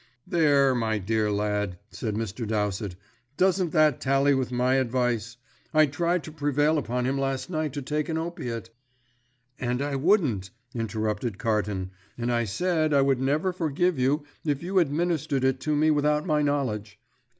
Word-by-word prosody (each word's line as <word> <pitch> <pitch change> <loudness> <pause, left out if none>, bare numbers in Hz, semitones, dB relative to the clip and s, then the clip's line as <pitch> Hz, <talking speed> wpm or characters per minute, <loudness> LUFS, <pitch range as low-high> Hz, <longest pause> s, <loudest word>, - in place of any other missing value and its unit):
"There, 145 -5 +3
my 110 -3 0
dear 105 +2 0
lad," 105 -2 -1
said 110 -4 -3
Mr. 110 +1 -3
Dowsett, 105 -3 -1 0.4
"doesn't 185 -1 +2
that 155 -4 +3
tally 135 +1 +3
with 130 -2 -1
my 125 +2 +2
advice? 120 -2 0 0.4
I 155 0 +7
tried 170 +4 0
to 155 - -8
prevail 145 0 +1
upon 125 -1 -2
him 135 +2 0
last 135 +4 -2
night 155 -3 -1
to 145 -2 -4
take 150 +3 -2
an 160 - -1
opiate 125 -9 -4 0.5
" 120 0 -42 0.3
"And 125 0 -1
I 140 0 -1
wouldn't," 135 - +2 0.2
interrupted 110 -1 -2
Carton, 105 -4 -1 0.3
"and 120 0 -1
I 120 0 +1
said 155 - +1
I 140 - +5
would 135 -2 +2
never 150 +7 +1
forgive 170 -1 0
you 140 +4 +2 0.2
if 145 -1 -1
you 190 +2 +2
administered 155 -3 0
it 130 0 +2
to 150 +3 -1
me 155 +1 +3
without 150 0 +2
my 155 -4 +2
knowledge. 125 -9 -1
135 Hz, 165 wpm, -26 LUFS, 115-155 Hz, 0.5 s, I